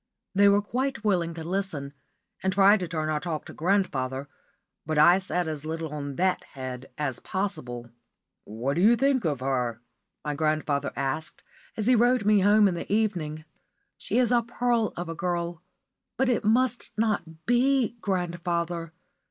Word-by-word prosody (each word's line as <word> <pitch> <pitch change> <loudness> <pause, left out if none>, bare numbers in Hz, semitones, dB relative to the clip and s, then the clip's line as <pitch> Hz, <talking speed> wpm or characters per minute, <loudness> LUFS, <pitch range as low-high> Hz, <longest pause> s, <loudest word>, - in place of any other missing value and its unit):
They 200 +1 +6
were 200 +1 +3
quite 255 +3 -2
willing 175 -5 +1
to 165 - -6
listen, 165 -6 -3 0.5
and 190 - +1
tried 200 +2 +5
to 180 - -3
turn 155 -2 -2
our 155 -1 0
talk 160 -1 -4
to - - -10
grandfather; 140 -8 0 0.6
but 155 0 -2
I 175 +5 +7
said 180 -3 -2
as 155 -2 -4
little 160 -1 -4
on 145 -2 -5
that 185 +3 +1
head 130 -1 -6
as 135 -5 -2
possible. 130 - -4 0.5
"What 120 +8 -3
d' - - +2
you 220 +6 +6
think 265 -1 +2
of 145 -5 -1
her?" 125 -3 -1 0.5
my 150 - -1
grandfather 155 -1 0
asked, 140 +4 -3 0.3
as 215 - -1
he 255 - +5
rowed 240 -1 +3
me 210 -1 +5
home 205 +2 +5
in 190 - +1
the 170 - -6
evening. 170 -8 -1 0.5
"She - - -3
is 250 -2 +3
a 240 -1 +4
pearl 235 -1 0
of 175 0 -4
a 165 - -4
girl. 170 0 -2 0.6
But 265 +1 +2
it 240 - +1
must 240 +3 +1
not 175 -7 -1
be, 245 0 +2
grandfather. 175 -3 -2
175 Hz, 170 wpm, -27 LUFS, 155-210 Hz, 0.6 s, I